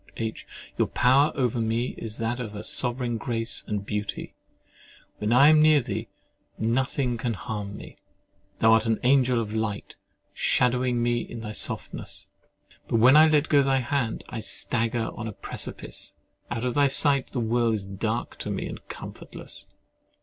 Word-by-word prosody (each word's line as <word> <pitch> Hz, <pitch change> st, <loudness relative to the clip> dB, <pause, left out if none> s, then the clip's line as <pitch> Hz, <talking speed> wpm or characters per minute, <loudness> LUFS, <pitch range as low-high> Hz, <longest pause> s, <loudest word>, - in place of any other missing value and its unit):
H. 110 Hz, -1 st, -4 dB, 0.3 s
Your -, -, +3 dB
power 135 Hz, +4 st, +4 dB
over 125 Hz, -3 st, 0 dB
me 115 Hz, +2 st, 0 dB
is 110 Hz, -1 st, -4 dB
that 115 Hz, +2 st, -2 dB
of 105 Hz, -4 st, -6 dB
sovereign 120 Hz, -1 st, 0 dB
grace 115 Hz, -1 st, -2 dB
and 105 Hz, -1 st, -3 dB
beauty. 105 Hz, -1 st, -4 dB, 0.9 s
When 105 Hz, +1 st, -1 dB
I 135 Hz, +5 st, +7 dB
am 155 Hz, -1 st, +6 dB
near 155 Hz, -1 st, +6 dB
thee, 120 Hz, -6 st, -4 dB, 0.5 s
nothing 125 Hz, +2 st, 0 dB
can 115 Hz, -1 st, -2 dB
harm 105 Hz, 0 st, -5 dB
me. -, -, -11 dB, 0.6 s
Thou 110 Hz, 0 st, +5 dB
art 110 Hz, 0 st, +3 dB
an 110 Hz, -1 st, +1 dB
angel 125 Hz, -1 st, +4 dB
of 110 Hz, -2 st, -4 dB
light, 110 Hz, -2 st, -3 dB, 0.4 s
shadowing 125 Hz, -1 st, +1 dB
me 120 Hz, -1 st, 0 dB
with 115 Hz, -1 st, -7 dB
thy 105 Hz, -, -5 dB
softness. -, -, -1 dB, 0.6 s
But -, -, -1 dB
when 125 Hz, +5 st, +6 dB
I 155 Hz, +1 st, +8 dB
let 155 Hz, 0 st, +3 dB
go 145 Hz, -2 st, +5 dB
thy 135 Hz, -1 st, +2 dB
hand, 125 Hz, -2 st, -2 dB
I 115 Hz, -, -5 dB
stagger 115 Hz, +1 st, -1 dB
on 115 Hz, -, -6 dB
a 110 Hz, -, -5 dB
precipice: -, -, -5 dB, 0.3 s
out 120 Hz, 0 st, -3 dB
of 125 Hz, -, 0 dB
thy 145 Hz, -1 st, +4 dB
sight 140 Hz, -1 st, +3 dB
the 130 Hz, -, -2 dB
world 115 Hz, 0 st, +1 dB
is 100 Hz, -2 st, -5 dB
dark 95 Hz, -1 st, -3 dB
to -, -, -4 dB
me -, -, -3 dB
and -, -, -8 dB
comfortless. -, -, -8 dB
120 Hz, 165 wpm, -26 LUFS, 110-130 Hz, 0.9 s, I